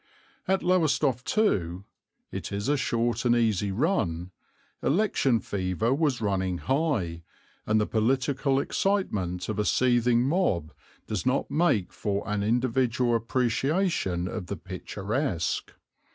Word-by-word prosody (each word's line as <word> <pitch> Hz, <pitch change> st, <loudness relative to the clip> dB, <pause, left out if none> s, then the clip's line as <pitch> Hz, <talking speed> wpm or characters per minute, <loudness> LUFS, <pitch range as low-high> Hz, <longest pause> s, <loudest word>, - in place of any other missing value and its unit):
At 190 Hz, 0 st, +1 dB
Lowestoft 150 Hz, -8 st, +2 dB
too 95 Hz, -, +1 dB, 0.5 s
it -, -, -5 dB
is 100 Hz, +3 st, -3 dB
a 145 Hz, -, +3 dB
short 120 Hz, -3 st, 0 dB
and 120 Hz, -1 st, +3 dB
easy 105 Hz, -4 st, +1 dB
run 95 Hz, -, 0 dB, 0.5 s
election 140 Hz, -, +2 dB
fever 100 Hz, +5 st, -1 dB
was 140 Hz, -4 st, 0 dB
running 95 Hz, -3 st, 0 dB
high, 130 Hz, -, -1 dB, 0.5 s
and 110 Hz, 0 st, +3 dB
the 105 Hz, -, +2 dB
political 135 Hz, +5 st, +1 dB
excitement 105 Hz, -, -1 dB
of 110 Hz, -2 st, -3 dB
a -, -, +2 dB
seething 120 Hz, -1 st, +3 dB
mob 130 Hz, -, 0 dB, 0.3 s
does 105 Hz, -5 st, -3 dB
not 130 Hz, +1 st, 0 dB
make 145 Hz, -, +1 dB
for 100 Hz, -1 st, -2 dB
an 105 Hz, -1 st, -1 dB
individual 120 Hz, +2 st, +1 dB
appreciation 120 Hz, -, 0 dB
of 95 Hz, -2 st, -5 dB
the 100 Hz, -, -4 dB
picturesque. 95 Hz, -, -3 dB
115 Hz, 125 wpm, -27 LUFS, 100-140 Hz, 0.5 s, a